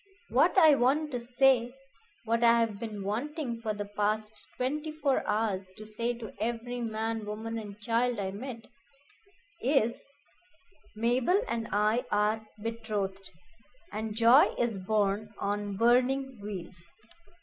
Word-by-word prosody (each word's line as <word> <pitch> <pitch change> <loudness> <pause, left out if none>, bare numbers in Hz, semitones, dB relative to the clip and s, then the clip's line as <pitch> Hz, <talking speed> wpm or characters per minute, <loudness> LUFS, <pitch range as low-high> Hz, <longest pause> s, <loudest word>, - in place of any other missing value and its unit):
"What - - +3
I 320 -5 +8
want 280 +4 +2
to 245 - -2
say 245 0 +2 0.5
what 230 +1 +1
I 235 0 +6
have 220 -3 0
been 210 -3 -5
wanting 240 - -3
for 220 -2 -1
the 205 -1 -4
past 210 +1 -2
twenty 300 +5 -2
four 295 -3 0
hours 205 -3 -1
to 215 - -9
say 230 +3 -2
to 230 -3 -8
every 240 +2 -2
man, 225 0 -2
woman, 220 +2 -4
and 205 -1 -9
child 235 +2 +1
I 195 -2 -2
met 230 +2 -7 1.0
is 245 -3 +1 0.9
'Mabel 245 - +2
and 230 -1 -2
I 215 +4 +2
are 210 +1 +1 0.2
betrothed, 210 -4 -3 0.6
and 215 0 -4
joy 235 +5 +6
is 230 -5 0
borne 210 +2 0
on 205 -1 -2
burning 255 +2 +2
wheels.' 180 -4 -7
225 Hz, 135 wpm, -30 LUFS, 210-245 Hz, 1.0 s, I